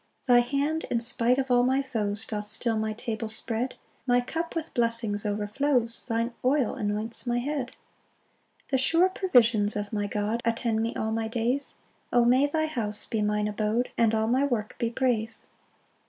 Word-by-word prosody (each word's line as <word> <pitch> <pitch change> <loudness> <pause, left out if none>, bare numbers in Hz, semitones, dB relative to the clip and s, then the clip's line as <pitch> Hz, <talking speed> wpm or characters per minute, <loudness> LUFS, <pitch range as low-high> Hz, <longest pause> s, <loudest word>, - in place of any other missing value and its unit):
4 250 -3 +4
Thy - - +7
hand, 285 +6 -1
in 235 - +1
spite 240 +1 +2
of 270 -1 -1
all 245 0 +5
my 260 +2 +2
foes, 215 -4 -1
Doth 210 -2 -4
still 225 +2 0
my 220 0 -1
table 225 0 -4
spread; 230 +3 -1 0.3
My 245 0 +4
cup 330 +8 -4
with 325 -1 -4
blessings 230 -3 0
overflows, 230 +4 +1
Thine 230 0 -1
oil 260 -1 +2
anoints 220 +1 -4
my 240 0 +1
head. 260 0 -3 0.9
5 - - -25
The 265 - +3
sure 335 +7 +4
provisions 240 - +3
of 205 +1 -4
my 205 -1 -1
God 210 +3 -2
Attend 230 -1 0
me 230 +1 -2
all 220 0 -2
my 225 0 -1
days; 240 +5 -1 0.4
O 240 -1 +4
may 255 +4 +4
thy 315 +2 0
house 215 -9 -2
be 220 - -2
mine 210 0 0
abode, 215 +3 -1
And 225 -1 +3
all 220 0 +1
my 255 +5 +2
work 235 -7 -1
be 235 - 0
praise! 230 -2 -1
235 Hz, 185 wpm, -27 LUFS, 220-255 Hz, 0.9 s, Thy